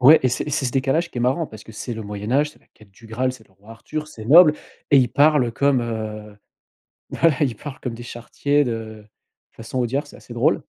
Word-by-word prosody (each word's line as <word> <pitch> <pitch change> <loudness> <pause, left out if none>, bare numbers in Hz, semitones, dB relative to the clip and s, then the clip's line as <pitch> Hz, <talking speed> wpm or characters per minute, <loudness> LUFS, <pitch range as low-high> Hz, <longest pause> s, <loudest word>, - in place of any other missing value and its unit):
Ouais, 145 +5 +8
et - - +5
c'est 125 - -2
et - - -5
c'est 145 -1 -1
ce 125 - -3
décalage 140 +6 0
qui 125 - -6
est - - -1
marrant 135 +6 +1
parce 110 -1 -12
que - - -12
c'est 120 +3 -6
le 110 - -6
Moyen 105 +2 -5
Âge, 150 +2 +2
c'est - - -22
la - - -30
quête 105 -2 -20
du 115 +4 -17
Graal, 125 +3 -1
c'est 115 -4 -15
le - - -29
roi 100 +4 -19
Arthur, 155 +7 -6
c'est 110 -7 -10
noble 155 +4 +7 0.4
et 140 - +7
ils 125 - +3
parlent 140 -1 +3
comme, 140 +1 +2
heu 110 -2 -5 0.7
voilà 165 -4 +2
ils 130 -6 +1
parlent 145 +5 -9
comme 120 -3 -5
des 120 - -9
charretiers 140 +5 -1
de 110 -3 -5 0.5
façon 115 +3 -6
Audiard 130 +4 -1
c'est - - -14
assez - - -12
drôle. - - +2
125 Hz, 245 wpm, -22 LUFS, 110-145 Hz, 0.7 s, Ouais